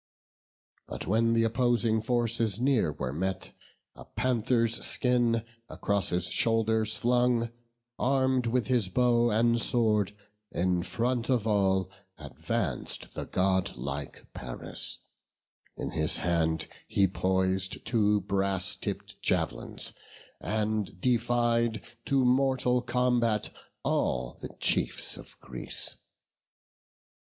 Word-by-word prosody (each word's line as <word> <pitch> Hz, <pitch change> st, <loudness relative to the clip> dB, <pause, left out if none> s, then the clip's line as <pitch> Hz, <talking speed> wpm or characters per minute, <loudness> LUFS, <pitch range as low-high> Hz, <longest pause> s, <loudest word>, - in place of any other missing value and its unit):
But -, -, -5 dB
when 115 Hz, +3 st, +2 dB
th' 115 Hz, -, +4 dB
opposing 115 Hz, -1 st, +2 dB
forces 115 Hz, -2 st, 0 dB
near 125 Hz, -, +2 dB
were 65 Hz, -3 st, -4 dB
met, 95 Hz, +4 st, -3 dB, 0.4 s
A -, -, -11 dB
panther's 115 Hz, -2 st, 0 dB
skin 120 Hz, -2 st, +2 dB, 0.3 s
across 100 Hz, -2 st, -1 dB
his 90 Hz, 0 st, -1 dB
shoulders 110 Hz, -1 st, +2 dB
flung, 120 Hz, -1 st, +2 dB, 0.5 s
Arm'd 130 Hz, -2 st, +2 dB
with 120 Hz, 0 st, +1 dB
his 120 Hz, -7 st, +1 dB
bow 120 Hz, +2 st, +3 dB
and 115 Hz, +1 st, +3 dB
sword, 105 Hz, -5 st, +1 dB, 0.4 s
in 90 Hz, 0 st, +1 dB
front 120 Hz, +5 st, -1 dB
of 120 Hz, -5 st, +2 dB
all 95 Hz, -3 st, +2 dB, 0.3 s
Advanc'd 70 Hz, -5 st, -4 dB
the -, -, -4 dB
godlike 75 Hz, -7 st, -1 dB
Paris; 60 Hz, 0 st, -6 dB, 0.8 s
in -, -, -4 dB
his 80 Hz, -1 st, 0 dB
hand 80 Hz, -2 st, 0 dB, 0.2 s
He 100 Hz, -, +3 dB
pois'd 95 Hz, 0 st, 0 dB
two 105 Hz, -3 st, +2 dB
brass 95 Hz, +1 st, 0 dB
tipp'd 95 Hz, -, -6 dB
jav'lins, -, -, -1 dB, 0.5 s
and 105 Hz, -3 st, -2 dB
defied 120 Hz, -1 st, +2 dB, 0.3 s
To 135 Hz, -2 st, +2 dB
mortal 125 Hz, -1 st, +3 dB
combat 120 Hz, -3 st, +1 dB, 0.3 s
all 60 Hz, -1 st, -1 dB
the -, -, -5 dB
chiefs -, -, +1 dB
of -, -, -12 dB
Greece. -, -, -4 dB
110 Hz, 105 wpm, -29 LUFS, 95-120 Hz, 0.8 s, th